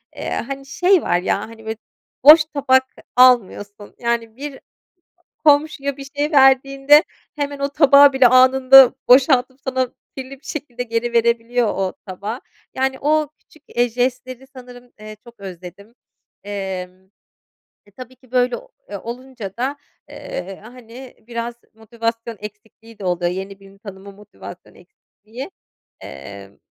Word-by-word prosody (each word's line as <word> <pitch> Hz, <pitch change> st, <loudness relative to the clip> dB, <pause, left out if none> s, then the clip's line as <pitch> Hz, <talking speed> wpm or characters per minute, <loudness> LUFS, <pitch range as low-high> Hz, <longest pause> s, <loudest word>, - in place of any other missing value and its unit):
eee, -, -, -6 dB
hani, 275 Hz, +2 st, -5 dB
şey 360 Hz, +6 st, +2 dB
var 175 Hz, -, 0 dB
ya, 180 Hz, -, -1 dB
hani, 225 Hz, 0 st, -11 dB
böyle 220 Hz, 0 st, -5 dB, 0.5 s
boş 310 Hz, +3 st, +9 dB
tabak 270 Hz, -4 st, +2 dB, 0.3 s
almıyorsun, 210 Hz, -5 st, +2 dB
yani, 235 Hz, -1 st, -2 dB
bir 280 Hz, +1 st, -8 dB, 0.9 s
komşuya 285 Hz, -2 st, +2 dB
bir 275 Hz, -, -9 dB
şey 295 Hz, +2 st, -1 dB
verdiğinde 275 Hz, +1 st, +5 dB, 0.3 s
hemen 285 Hz, -1 st, -4 dB
o 280 Hz, 0 st, -1 dB
tabağı 285 Hz, -1 st, +6 dB
bile 265 Hz, -2 st, +5 dB
anında 260 Hz, +1 st, +6 dB
boşaltıp 260 Hz, 0 st, +4 dB
sana 260 Hz, -1 st, -1 dB, 0.3 s
kirli 260 Hz, 0 st, -7 dB
bir -, -, -29 dB
şekilde 260 Hz, -5 st, -6 dB
geri 235 Hz, 0 st, -3 dB
verebiliyor 235 Hz, 0 st, +1 dB
o 195 Hz, -2 st, -2 dB
tabağı. 205 Hz, +5 st, -6 dB, 0.3 s
Yani, 265 Hz, 0 st, -1 dB
o 305 Hz, 0 st, +1 dB
küçük, 310 Hz, -, -25 dB
eee, 240 Hz, 0 st, +2 dB
jestleri 255 Hz, +2 st, -3 dB
sanırım, 245 Hz, -1 st, -14 dB
eee, 215 Hz, 0 st, -11 dB
çok 235 Hz, -2 st, -17 dB
özledim. 190 Hz, +3 st, -11 dB, 0.5 s
Emm, 190 Hz, -2 st, -6 dB, 0.8 s
e, -, -, -21 dB
tabii 255 Hz, 0 st, -11 dB
ki, 255 Hz, -1 st, -25 dB
böyle, 250 Hz, -1 st, +1 dB
o -, -, -14 dB, 0.2 s
eee, 205 Hz, -, -5 dB
olunca 235 Hz, -3 st, -9 dB
da, 265 Hz, +4 st, -3 dB, 0.3 s
eee, 190 Hz, +1 st, -8 dB
hani, 245 Hz, +2 st, -13 dB
biraz 235 Hz, 0 st, -5 dB, 0.2 s
motivasyon 230 Hz, +1 st, -5 dB
eksikliği 215 Hz, +2 st, -13 dB
de 200 Hz, -, -9 dB
oluyor, 175 Hz, -1 st, -1 dB
yeni 195 Hz, +2 st, -7 dB
birini 195 Hz, 0 st, -18 dB
tanıma 200 Hz, -1 st, -11 dB
motivasyon 205 Hz, +1 st, -14 dB
eksikliği. 235 Hz, -, -13 dB, 0.5 s
Emm, 100 Hz, +9 st, -11 dB
245 Hz, 135 wpm, -19 LUFS, 210-265 Hz, 0.9 s, boş